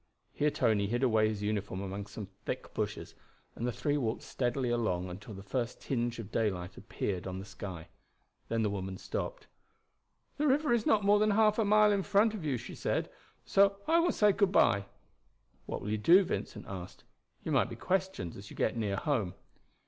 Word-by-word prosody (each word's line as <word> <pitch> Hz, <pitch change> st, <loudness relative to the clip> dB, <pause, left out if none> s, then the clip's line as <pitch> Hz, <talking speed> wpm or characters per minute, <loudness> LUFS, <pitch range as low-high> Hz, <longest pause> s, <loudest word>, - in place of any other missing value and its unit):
Here 150 Hz, -, +2 dB
Tony 105 Hz, -7 st, +2 dB
hid 120 Hz, +5 st, -1 dB
away 110 Hz, -4 st, +4 dB
his 105 Hz, -1 st, -4 dB
uniform 105 Hz, -2 st, -2 dB
among 100 Hz, +1 st, -5 dB
some 105 Hz, -, -7 dB
thick 100 Hz, +2 st, -7 dB
bushes, -, -, -3 dB, 0.4 s
and 120 Hz, -, -2 dB
the -, -, 0 dB
three 145 Hz, +4 st, 0 dB
walked 115 Hz, -5 st, -2 dB
steadily 125 Hz, 0 st, -1 dB
along 95 Hz, -7 st, 0 dB
until 105 Hz, +4 st, -9 dB
the 95 Hz, -, -9 dB
first 120 Hz, +4 st, -3 dB
tinge 120 Hz, -2 st, -2 dB
of 110 Hz, -3 st, -7 dB
daylight 95 Hz, -4 st, -1 dB
appeared 100 Hz, -3 st, -4 dB
on 95 Hz, 0 st, -4 dB
the 95 Hz, -, -6 dB
sky. 95 Hz, -4 st, -8 dB, 0.6 s
Then 115 Hz, -1 st, +1 dB
the 105 Hz, -, +1 dB
woman 95 Hz, -1 st, -4 dB
stopped. -, -, -4 dB, 0.9 s
"The 300 Hz, -, +2 dB
river 285 Hz, 0 st, +3 dB
is 230 Hz, -2 st, +1 dB
not 205 Hz, -2 st, +3 dB
more 205 Hz, +1 st, +5 dB
than 215 Hz, 0 st, +3 dB
half 215 Hz, +1 st, +4 dB
a 220 Hz, -, +3 dB
mile 210 Hz, +1 st, +5 dB
in 200 Hz, -1 st, +2 dB
front 210 Hz, +3 st, +3 dB
of 205 Hz, -6 st, -5 dB
you," 140 Hz, -5 st, 0 dB
she 115 Hz, -, -8 dB
said; -, -, -1 dB, 0.3 s
"so 200 Hz, 0 st, +4 dB
I 335 Hz, +1 st, +5 dB
will 345 Hz, +1 st, +3 dB
say 210 Hz, -1 st, +4 dB
good 200 Hz, -1 st, +2 dB
by." 100 Hz, -, +4 dB, 0.8 s
"What -, -, -4 dB
will 105 Hz, -, -3 dB
you 110 Hz, -, 0 dB
do?" 175 Hz, -, +7 dB
Vincent -, -, -4 dB
asked. 95 Hz, -1 st, -8 dB, 0.4 s
"You -, -, -3 dB
might -, -, +3 dB
be -, -, -6 dB
questioned 190 Hz, -, -1 dB
as 100 Hz, +1 st, -10 dB
you -, -, -11 dB
get 110 Hz, -, 0 dB
near 105 Hz, -4 st, -1 dB
home." 110 Hz, -7 st, -1 dB
115 Hz, 200 wpm, -31 LUFS, -, 0.9 s, do